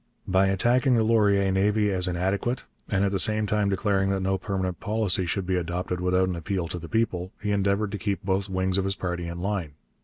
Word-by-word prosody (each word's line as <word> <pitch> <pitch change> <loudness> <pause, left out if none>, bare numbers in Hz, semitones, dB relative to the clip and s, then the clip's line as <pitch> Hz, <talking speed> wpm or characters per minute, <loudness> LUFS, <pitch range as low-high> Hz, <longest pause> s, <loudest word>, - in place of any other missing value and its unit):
By 95 +1 +3
attacking 120 +7 +2
the 115 - +3
Laurier 100 -3 +3
navy 105 +2 +2
as 90 -1 +1
inadequate, 95 +7 -1 0.3
and 100 -1 +2
at 100 - 0
the 100 - 0
same 110 +2 +3
time 105 0 +1
declaring 95 -1 +1
that 95 -1 0
no 95 0 +1
permanent 95 -2 -3
policy 100 -4 0
should 95 +2 -1
be 95 0 0
adopted 90 +1 -3
without 90 +1 +2
an 90 - -2
appeal 85 +1 -2
to 90 - -4
the 85 - -9
people, 95 -5 -1
he 105 -1 -2
endeavoured 100 +1 +1
to 105 - -4
keep 100 0 -2
both 95 +1 0
wings 95 0 0
of 95 - -1
his 95 0 0
party 90 -2 -3
in 85 +1 -6
line. 95 -6 -2
95 Hz, 220 wpm, -26 LUFS, 90-105 Hz, 0.3 s, By